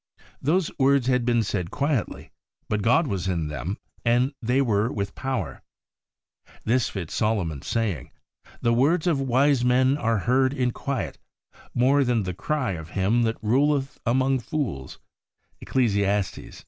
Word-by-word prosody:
Those 165 Hz, +4 st, +1 dB
words 135 Hz, -1 st, +4 dB
had 125 Hz, -2 st, +1 dB
been 120 Hz, -2 st, +2 dB
said 90 Hz, -5 st, -2 dB
quietly, 140 Hz, -2 st, -2 dB, 0.4 s
but 105 Hz, -1 st, -1 dB
God 125 Hz, +11 st, +3 dB
was 95 Hz, -, -2 dB
in 85 Hz, -5 st, -1 dB
them, 75 Hz, -, -4 dB, 0.3 s
and 125 Hz, +4 st, +2 dB
they 125 Hz, +3 st, +1 dB
were 115 Hz, -3 st, +1 dB
with 100 Hz, -1 st, -3 dB
power. 125 Hz, -, -4 dB, 1.0 s
This 120 Hz, 0 st, +1 dB
fits 90 Hz, -6 st, -6 dB
Solomon's 95 Hz, -10 st, -1 dB
saying, 105 Hz, -, -1 dB, 0.3 s
' -, -, -25 dB
The 115 Hz, -, +3 dB
words 155 Hz, +8 st, +2 dB
of 160 Hz, -6 st, +2 dB
wise 135 Hz, 0 st, +3 dB
men 130 Hz, +2 st, +3 dB
are 115 Hz, -5 st, +1 dB
heard 130 Hz, +6 st, +2 dB
in 125 Hz, -3 st, +1 dB
quiet 140 Hz, +2 st, -4 dB, 0.6 s
more 135 Hz, +3 st, +4 dB
than 120 Hz, -4 st, +1 dB
the 90 Hz, -1 st, -3 dB
cry 125 Hz, -, -1 dB
of 80 Hz, -3 st, -6 dB
him 100 Hz, +6 st, +2 dB
that 115 Hz, -, -4 dB
ruleth 135 Hz, +4 st, +1 dB
among 130 Hz, +2 st, +2 dB
fools 120 Hz, -, -4 dB, 0.4 s
' -, -, -45 dB
(Eccles. 120 Hz, -6 st, +1 dB
120 Hz, 150 wpm, -25 LUFS, 100-135 Hz, 1.0 s, words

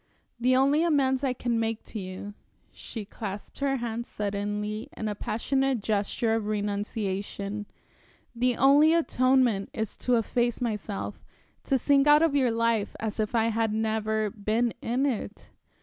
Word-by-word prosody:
The 255 Hz, +2 st, +3 dB
only 280 Hz, +4 st, +4 dB
amends 275 Hz, -5 st, +2 dB
I 265 Hz, -2 st, +1 dB
can 240 Hz, -2 st, -1 dB
make 225 Hz, 0 st, -2 dB
to 220 Hz, -, -7 dB
you" 190 Hz, +2 st, -7 dB, 0.4 s
she 220 Hz, -4 st, -7 dB
clasped 200 Hz, 0 st, -7 dB
her 275 Hz, -1 st, +1 dB
hands 235 Hz, -1 st, -4 dB
suddenly 210 Hz, +3 st, -3 dB
in 220 Hz, -, -3 dB
a 210 Hz, -, -1 dB
passionate 255 Hz, +5 st, 0 dB
gesture 220 Hz, +2 st, 0 dB
of 225 Hz, -2 st, -1 dB
renunciation 205 Hz, -1 st, -3 dB, 0.7 s
"the 245 Hz, 0 st, +1 dB
only 290 Hz, +4 st, +6 dB
atonement 255 Hz, -9 st, +2 dB
is 220 Hz, -2 st, -3 dB
to 250 Hz, -, +1 dB
efface 240 Hz, +1 st, 0 dB
myself, 210 Hz, -4 st, -4 dB, 0.4 s
to 270 Hz, -, +2 dB
sink 280 Hz, +2 st, +3 dB
out 295 Hz, +2 st, +7 dB
of 325 Hz, -3 st, +3 dB
your 260 Hz, -3 st, +3 dB
life 230 Hz, -2 st, 0 dB
as 220 Hz, 0 st, -4 dB
if 215 Hz, +2 st, -1 dB
I 225 Hz, 0 st, +3 dB
had 225 Hz, -1 st, 0 dB
never 220 Hz, -1 st, 0 dB
been 220 Hz, +3 st, 0 dB
in 250 Hz, +4 st, 0 dB
it." 220 Hz, -5 st, -4 dB
225 Hz, 150 wpm, -27 LUFS, 210-255 Hz, 0.7 s, out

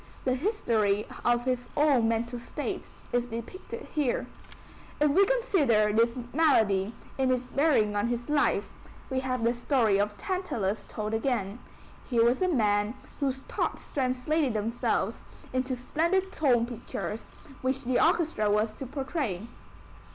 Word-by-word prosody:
The 255 Hz, -, +3 dB
history 230 Hz, -, +1 dB, 0.2 s
of 240 Hz, 0 st, +2 dB
his 250 Hz, -1 st, -1 dB
own 280 Hz, -6 st, +4 dB
mental 235 Hz, +2 st, -1 dB
state 235 Hz, -, -5 dB, 0.3 s
is 245 Hz, 0 st, +1 dB
depicted 245 Hz, -, -7 dB
here. 290 Hz, -6 st, 0 dB, 0.7 s
If 295 Hz, -1 st, +4 dB
we 390 Hz, +6 st, +5 dB
consider 300 Hz, -, +3 dB
his 230 Hz, +3 st, +3 dB, 0.2 s
malady 220 Hz, -9 st, +3 dB, 0.2 s
in 265 Hz, -1 st, +3 dB
its 250 Hz, -1 st, +1 dB
bearing 255 Hz, -7 st, +2 dB
on 205 Hz, +3 st, +1 dB
his 240 Hz, 0 st, -2 dB
life, 285 Hz, -9 st, +2 dB, 0.4 s
we 260 Hz, -, +1 dB
have 255 Hz, -2 st, -2 dB
the 235 Hz, +1 st, +3 dB
story 235 Hz, -5 st, +2 dB
of 205 Hz, 0 st, 0 dB
Tantalus 240 Hz, -, -2 dB
told 215 Hz, 0 st, -4 dB
again. 225 Hz, -3 st, -1 dB, 0.5 s
Here 230 Hz, -3 st, +4 dB
was 245 Hz, +6 st, +2 dB
a 370 Hz, -, +3 dB
man 210 Hz, -, +2 dB, 0.2 s
whose 270 Hz, -2 st, -1 dB
thoughts -, -, -3 dB
translated 260 Hz, 0 st, 0 dB
themselves 225 Hz, +3 st, -1 dB, 0.3 s
into 255 Hz, 0 st, 0 dB
splendid 340 Hz, +9 st, 0 dB
tone 250 Hz, -9 st, +3 dB
pictures 230 Hz, -2 st, -5 dB, 0.3 s
which 265 Hz, +1 st, -1 dB
the 250 Hz, 0 st, +2 dB
orchestra 320 Hz, -, +2 dB
was 215 Hz, +1 st, +1 dB
to 270 Hz, -, -6 dB
portray. 265 Hz, -, -3 dB
245 Hz, 140 wpm, -28 LUFS, 220-285 Hz, 0.7 s, we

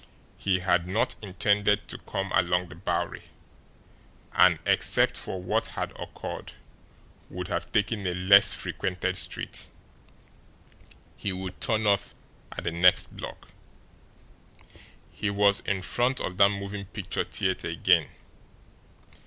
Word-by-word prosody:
He 95 Hz, -2 st, 0 dB
had 90 Hz, -1 st, +1 dB
not 95 Hz, +5 st, +1 dB
intended 105 Hz, +1 st, +1 dB
to -, -, -4 dB
come 95 Hz, -1 st, -4 dB
along 90 Hz, 0 st, +1 dB
the 90 Hz, -, -11 dB
Bowery, 85 Hz, -, -2 dB, 1.1 s
and, 90 Hz, -3 st, +5 dB
except -, -, +3 dB
for 95 Hz, -, -3 dB
what 90 Hz, -, 0 dB
had -, -, -4 dB
occurred, -, -, -7 dB, 0.8 s
would -, -, -6 dB
have -, -, -3 dB
taken 105 Hz, -1 st, 0 dB
a 90 Hz, -, -1 dB
less 100 Hz, +2 st, +7 dB
frequented 90 Hz, -1 st, -2 dB
street. -, -, -2 dB, 1.5 s
He 100 Hz, -, -3 dB
would 95 Hz, 0 st, -6 dB
turn 110 Hz, -1 st, +1 dB
off 100 Hz, -1 st, +1 dB, 0.4 s
at -, -, -6 dB
the 85 Hz, -, -1 dB
next 90 Hz, +2 st, +3 dB
block. -, -, -9 dB, 1.6 s
He 105 Hz, -, -3 dB
was 100 Hz, 0 st, +3 dB
in 95 Hz, -1 st, -1 dB
front 125 Hz, +6 st, 0 dB
of 90 Hz, -, -4 dB
that 100 Hz, 0 st, +6 dB
moving 100 Hz, 0 st, -5 dB
picture 100 Hz, -1 st, -3 dB
theatre 95 Hz, -3 st, -1 dB
again. 85 Hz, -1 st, +3 dB
95 Hz, 125 wpm, -27 LUFS, 90-100 Hz, 1.6 s, less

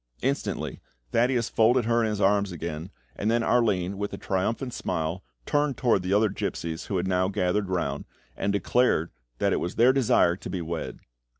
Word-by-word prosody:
Instantly 135 Hz, +2 st, -2 dB, 0.3 s
Thaddeus 120 Hz, -1 st, +2 dB
folded 120 Hz, +2 st, +3 dB
her 115 Hz, 0 st, +2 dB
in 110 Hz, -, +1 dB
his 105 Hz, -1 st, -2 dB
arms 100 Hz, 0 st, +2 dB
again, 85 Hz, 0 st, -5 dB, 0.3 s
and 105 Hz, -, -1 dB
then 115 Hz, +1 st, +2 dB
Arline, 100 Hz, -6 st, +1 dB
with 100 Hz, 0 st, -2 dB
a -, -, -4 dB
triumphant 115 Hz, +7 st, -2 dB
smile, 80 Hz, +3 st, -3 dB, 0.2 s
turned 145 Hz, -2 st, +1 dB
towards 115 Hz, -7 st, +2 dB
the 90 Hz, -, -2 dB
other 105 Hz, +2 st, +4 dB
gipsies 85 Hz, -4 st, -4 dB
who 100 Hz, -, -1 dB
had 90 Hz, -, -1 dB
now 90 Hz, 0 st, +2 dB
gathered 95 Hz, +1 st, 0 dB
round, 80 Hz, -6 st, -2 dB, 0.3 s
and 100 Hz, -, -1 dB
declared 100 Hz, -4 st, +2 dB, 0.3 s
that -, -, +1 dB
it -, -, +1 dB
was 90 Hz, -, -3 dB
their 125 Hz, +3 st, +5 dB
desire 115 Hz, -9 st, +3 dB
to 90 Hz, -, -8 dB
be 90 Hz, 0 st, -3 dB
wed. 85 Hz, -1 st, -5 dB
100 Hz, 185 wpm, -26 LUFS, 90-115 Hz, 0.3 s, their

